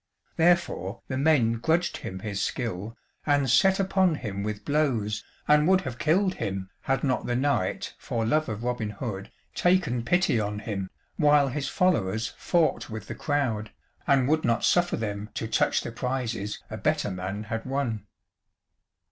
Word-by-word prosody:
Therefore 165 - +1
the 130 - -2
men 130 -7 +3
grudged 165 +7 +1
him 95 0 -7
his 100 -2 -3
skill, 115 -2 -3 0.3
and 145 -2 +2
set 190 +11 +4
upon 190 -3 +2
him 100 -8 -4
with 105 0 -4
blows, 130 -9 0 0.2
and 150 +1 +5
would 190 0 +5
have 120 -2 -6
killed 185 +5 +2
him, 95 - -4
had 135 -1 0
not 130 -3 0
the 120 - 0
knight, 130 -8 0
for 115 -1 -2
love 155 +5 +1
of 110 +1 -4
Robin 120 -3 -1
Hood, 100 -2 -5 0.2
taken 175 -10 +2
pity 170 -3 +2
on 105 0 -2
him, 100 -3 -4 0.3
while 145 -3 +5
his 140 +2 -3
followers 115 - +1
fought 170 -3 +1
with 110 0 -6
the - - -6
crowd, 125 -8 -1 0.4
and 135 -3 +4
would 155 +2 +2
not 115 0 +2
suffer 175 0 +3
them 105 -1 -4
to 110 - -2
touch - - +2
the - - -5
prizes 115 -4 -3
a - - -4
better 105 - 0
man 95 +3 -4
had 115 +1 -4
won. 125 -6 -2
120 Hz, 165 wpm, -27 LUFS, 105-150 Hz, 0.4 s, and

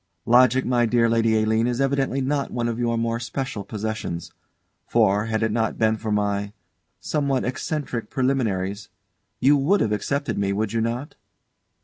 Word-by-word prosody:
Logic, 125 +2 +5
my 120 -1 +2
dear 115 0 +3
Lady 115 -1 +2
Aline, 110 +2 +2
is 125 0 -1
evidently 135 0 +1
not 140 +1 -1
one 120 -1 -2
of 115 0 -3
your 115 -1 0
more 115 0 -1
special 120 -2 -4
possessions. 105 -4 -4 0.6
For, 105 -2 +3
had 110 -1 -1
it 110 - +1
not 110 0 -1
been 110 0 +2
for 110 0 -4
my 100 0 -1 0.5
somewhat 140 -4 -1
eccentric 125 -3 -3
preliminaries 105 -7 -1 0.5
you 145 +2 +5
would 155 +9 +2
have 110 - +1
accepted 140 +6 -1
me, 100 0 0
would 105 +1 -2
you 115 - +1
not? 120 +5 -3
115 Hz, 160 wpm, -23 LUFS, 110-130 Hz, 0.6 s, Logic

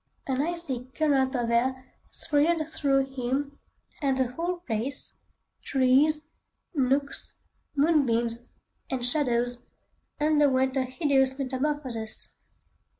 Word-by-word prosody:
An 265 0 0
icy 310 -6 +1
current 275 -4 +2
of 235 -2 -1
air 260 +2 0 0.2
thrilled 310 +1 +1
through 275 -3 +1
him, 270 +2 -3 0.4
and 270 -2 +1
the 255 -2 0
whole 345 +6 -3
place—trees, 275 +3 0 0.5
nooks, 275 -1 0 0.4
moonbeams, 240 -6 +2 0.4
and 255 -3 -1
shadows, 245 -3 +1 0.5
underwent 285 -4 +2
a 265 -1 +1
hideous 265 -1 +1
metamorphosis. 260 -4 -1
270 Hz, 90 wpm, -27 LUFS, 255-295 Hz, 0.5 s, current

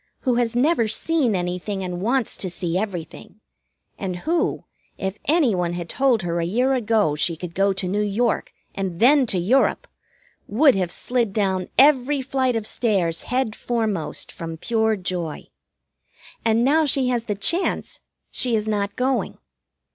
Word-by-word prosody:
Who 255 - +1
has 235 -1 0
never 250 -2 +2
seen 250 +1 +1
anything 180 +2 -3
and 180 -1 -4
wants 240 +3 0
to 185 - -3
see 175 -1 -3
everything, 190 0 -5 0.6
and 185 -2 -3
who, 335 +1 0 0.3
if 190 +1 -4
anyone 230 - +2
had 175 -1 -5
told 260 -7 +2
her 170 0 -1
a - - 0
year 245 +10 +1
ago 220 - +1
she 165 +3 +1
could 170 +1 -7
go 195 +2 +2
to 190 -1 -3
New 205 +3 0
York, 210 +3 0 0.2
and 190 -3 -4
then 265 +1 +5
to 195 - 0
Europe, 260 - +2 0.6
would 270 +6 +5
have 185 -4 -1
slid 240 -5 -1
down 190 -3 0
every 275 0 +4
flight 260 -2 0
of 225 -2 -2
stairs 190 -9 0
head 250 -4 0
foremost 220 -8 -2
from 165 -1 -7
pure 220 +3 +1
joy. 180 -5 -4 0.9
And 230 +1 +2
now 310 +3 +3
she 265 -2 +2
has 240 -2 -1
the 210 - -2
chance, 335 - -1 0.3
she 245 -3 +1
is 215 0 -1
not 205 -2 -1
going. 260 +1 -1
215 Hz, 160 wpm, -22 LUFS, 185-255 Hz, 0.9 s, then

